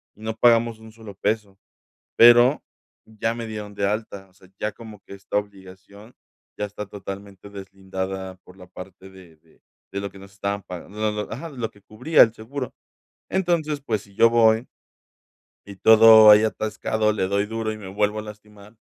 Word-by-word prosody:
y 105 - -20
no 110 0 -4
pagamos 115 -1 +3
$1 110 0 -14
solo 110 -2 -12
peso, 100 -1 -3 0.6
pero 120 +4 +6 0.4
ya 110 +1 -3
me 115 -1 -6
dieron 105 -2 -7
de 100 - -1
alta, 100 -2 -4
o - - -30
sea, 95 0 -22
ya 105 - -2
como 110 -2 -13
que - - -13
esta 100 +1 -4
obligación 100 +2 -9 0.4
ya 105 - -2
está 105 +1 -8
totalmente 100 0 -10
deslindada 95 -1 -7
por 90 - -18
la 90 - -13
parte 95 +1 -12
de 95 -4 -17
de - - -29 0.3
de 100 - -4
lo 100 -1 -6
que 95 - -14
nos 95 0 -15
estaban 100 +1 -3
pagan 90 0 -10
lo 105 +1 -2
lo 105 0 -5
ajá, 140 +9 -7
de 135 - -14
lo 115 -2 -4
que 105 - -22
cubría 125 +11 +2
el 115 - +6
seguro. 125 +4 -7 0.6
Entonces, 170 -5 -1
pues, 110 -7 -3
si 100 -1 -20
yo 115 - +5
voy 115 0 +3 1.0
y 100 - -11
todo 110 0 +8
ahí 105 +1 +6
atascado, 110 0 -1
le 95 -3 -1
doy 100 +1 0
duro, 110 0 -4
y 110 - -7
me 105 -3 -10
vuelvo 105 +2 -1
a - - -4
lastimar, 105 0 -14
105 Hz, 190 wpm, -23 LUFS, 100-110 Hz, 1.0 s, todo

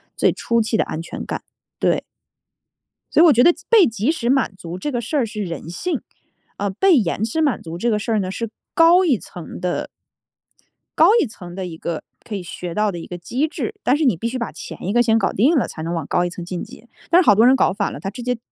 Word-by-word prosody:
最 - - +3
初 235 -1 0
期 220 +1 -1
的 - - +3
安 160 - -5
全 170 - -7
感。 - - -5 0.4
对。 - - +1 1.1
所 - - +5
以 - - +8
我 315 - +7
觉 245 +2 +5
得 345 - +7
即 - - -18
被 440 -7 +7
即 225 +6 0
时 245 -7 -2
满 265 -6 +2
足 170 0 -7
这 295 +9 -3
个 240 -1 -1
事 290 +7 -2
儿 250 - +2
是 210 -1 -5
人 165 -2 -6
性， 350 - -2 0.6
呃， 200 0 -1
被 370 - +3
延 200 -1 0
迟 230 +9 0
满 280 -9 +1
足 165 0 -7
这 235 +6 0
个 210 - +2
事 225 - -3
儿 215 - +2
呢， 185 -1 -2
是 230 +2 -4 0.3
高 340 +3 +6
一 270 -9 +3
层 175 -2 -9
的 180 -1 -2 1.1
高 325 - +8
一 - - +2
层 180 -6 -10
的 190 -1 -4
一 165 -2 -7
个 165 -1 -4 0.2
可 215 - -4
以 190 - -4
学 175 0 -6
到 210 -1 +1
的 175 - -6
一 - - -9
个 175 - -6
机 255 - -1
制， 415 +6 -4
但 255 - +3
是 310 - 0
你 235 - +3
必 230 - -2
须 255 +2 -3
把 235 - -3
前 - - -9
一 195 - -1
个 240 +2 +4
先 225 -1 +3
搞 - - +1
定 275 - +3
了， - - +2
才 160 - -8
能 165 +2 -3
往 165 -4 -3
高 175 - +1
一 - - -2
层 175 0 -7
晋 175 0 -5
级。 240 - -11 0.2
但 350 +2 +6
是 - - -8
好 205 - +7
多 225 +4 +5
人 265 - +6
搞 - - +3
反 200 +1 -2
了， - - -8
他 195 - -3
直 245 - -8
接 250 0 -1
220 Hz, 290 characters per minute, -21 LUFS, 180-260 Hz, 1.1 s, 以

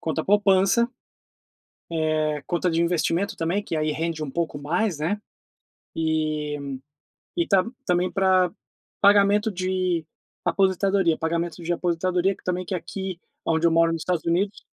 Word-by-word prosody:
conta 160 0 -2
poupança, 200 +3 +4 1.0
eh, 155 -2 0
conta 175 +1 0
de 165 0 +1
investimento 170 +4 0
também, 170 +5 -1
que 170 - -3
aí 155 0 0
rende 160 0 -2
um 150 - -4
pouco 165 0 -2
mais, 170 +5 -1
né, 175 +8 -1 0.8
e 155 -2 -1 0.8
e 345 -1 +1
tá 190 -2 +4 0.2
também 180 +1 +1
pra 185 -2 +3 0.5
pagamento 205 +2 +5
de 185 -2 -1 0.4
aposentadoria. 190 -2 +2
Pagamento 170 +1 -2
de 170 +1 -1
aposentadoria 180 +2 0
que - - -24
também 180 0 -1
que 185 - -4
é - - 0
aqui 185 +1 -6 0.3
aonde 165 +1 +2
eu - - +4
moro 165 0 +4
nos 165 - -3
Estados 180 -3 -1
Unidos 190 +4 0
175 Hz, 145 wpm, -24 LUFS, 160-190 Hz, 1.0 s, pagamento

